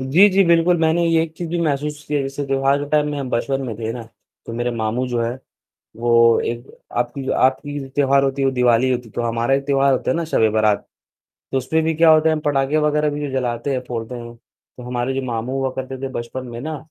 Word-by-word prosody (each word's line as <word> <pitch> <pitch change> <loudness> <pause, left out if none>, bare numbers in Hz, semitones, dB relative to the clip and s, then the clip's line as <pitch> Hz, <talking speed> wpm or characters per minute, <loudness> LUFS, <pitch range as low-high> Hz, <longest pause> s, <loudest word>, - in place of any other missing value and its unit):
जी, 155 +11 +5
जी, 195 0 +4
बिल्कुल। 170 +1 +4
मैंने 165 +1 +2
ये 165 -1 +3
एक 165 -1 -5
चीज़ 175 - -5
भी 175 - -1
महसूस 150 0 -2
की 150 - -2
है 145 - +1
जैसे 135 +1 -4
त्योहार 135 +1 +2
के 145 - -5
टाइम 150 0 +2
में 145 - -3
हम 135 -2 -4
बचपन 135 +3 -1
में 115 - -4
थे 110 0 -3
ना, 120 0 -6 0.4
तो - - -6
मेरे 120 +1 -1
मामू 115 +2 -2
जो 120 -1 -1
है, 115 0 0 0.7
वो 115 0 +4
एक 120 +2 -5 0.3
आपकी 120 +3 -2
आपकी 145 +3 +1
त्योहार 140 0 +2
होती 135 0 -1
है - - +2
वो - - +2
दिवाली 125 0 +3
होती 125 -1 -2
है - - -16
तो 120 - -1
हमारा 115 +2 0
एक 140 0 -3
त्योहार 140 -1 +3
होता - - 0
है - - 0
ना 170 - -1
शब-ए-बारात, 110 -1 +2 0.7
तो 135 - +2
उसमें 160 +5 0
भी 160 - 0
क्या 165 +1 +5
होता 155 0 +5
है, - - +3
हम 155 - -3
पटाखे 140 +1 +1
वगैरह 150 0 +1
भी 145 -1 -4
जलाते 125 0 -2
हैं, 130 - -1
फोड़ते 115 0 -4
हैं। 120 -1 -8
तो 125 +1 -19
हमारे 125 +1 -2
जो 135 - -2
मामू 120 0 -3
हुआ 135 -1 0
करते 130 0 -5
थे 135 - -2
बचपन 125 +2 -5
में 120 0 -7
ना 155 +3 -4
135 Hz, 245 wpm, -20 LUFS, 120-150 Hz, 0.7 s, जी